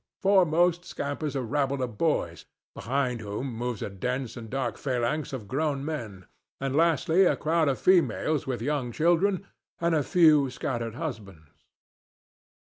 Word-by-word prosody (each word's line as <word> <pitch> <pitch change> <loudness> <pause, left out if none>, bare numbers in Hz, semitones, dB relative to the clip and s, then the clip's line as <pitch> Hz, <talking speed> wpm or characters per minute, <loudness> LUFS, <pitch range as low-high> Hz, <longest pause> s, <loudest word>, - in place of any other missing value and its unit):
Foremost 175 -2 +3
scampers 145 -2 -4
a 135 - -1
rabble 140 +1 -1
of 120 -4 -5
boys, 160 -2 0 0.3
behind 125 -1 -2
whom 110 +5 -4
moves 120 -1 -3
a - - -3
dense 125 +6 -3
and 115 -3 -8
dark 125 -3 -3
phalanx 130 +3 -1
of 125 -7 -6
grown 140 +3 -1
men, 115 - -5 0.3
and 135 0 -2
lastly 165 +3 +3
a - - +3
crowd 160 -1 +1
of 135 - 0
females 160 -5 +2
with 125 -3 -3
young 140 -3 -1
children 175 - +2 0.3
and 170 0 +1
a 155 - +3
few 155 -4 +4
scattered 120 -3 -4
husbands. 100 - -8
140 Hz, 145 wpm, -27 LUFS, 120-160 Hz, 0.3 s, few